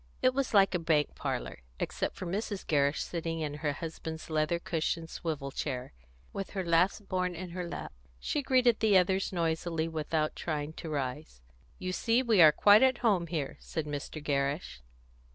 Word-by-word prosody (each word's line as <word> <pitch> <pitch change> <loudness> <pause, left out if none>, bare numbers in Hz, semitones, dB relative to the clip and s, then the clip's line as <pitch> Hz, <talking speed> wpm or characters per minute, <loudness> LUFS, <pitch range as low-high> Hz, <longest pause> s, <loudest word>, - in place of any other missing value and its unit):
It 255 - +5
was 275 0 -1
like 195 -1 +6
a 180 - +1
bank 160 -3 +1
parlour, - - -4 0.2
except - - -2
for - - -6
Mrs. 200 +2 -3
Gerrish 145 -1 +2
sitting 165 -1 -3
in 150 -2 -2
her 145 -2 0
husband's 160 +1 -6
leather 155 +2 +1
cushioned 165 -1 -2
swivel 150 -5 -4
chair, 130 - -4 0.4
with 195 - -4
her 190 -2 -3
last 180 +4 +2
born 180 -1 -1
in 180 +1 -6
her 175 -1 -4
lap; - - -6 0.3
she 290 - -1
greeted 255 -4 +3
the 210 -3 +5
others 190 +1 +2
noisily, 165 -1 -1
without 155 -1 -1
trying 150 -1 -3
to 160 - -7
rise. 130 - -4 0.3
"You 185 - -3
see 230 +6 +2
we 225 -7 +4
are 155 -2 +9
quite 205 +6 +6
at 260 -1 +4
home 185 -6 +3
here," 155 -5 -3
said 160 -2 -4
Mr. 150 +1 -5
Gerrish. 140 - -1
165 Hz, 175 wpm, -30 LUFS, 150-190 Hz, 0.4 s, are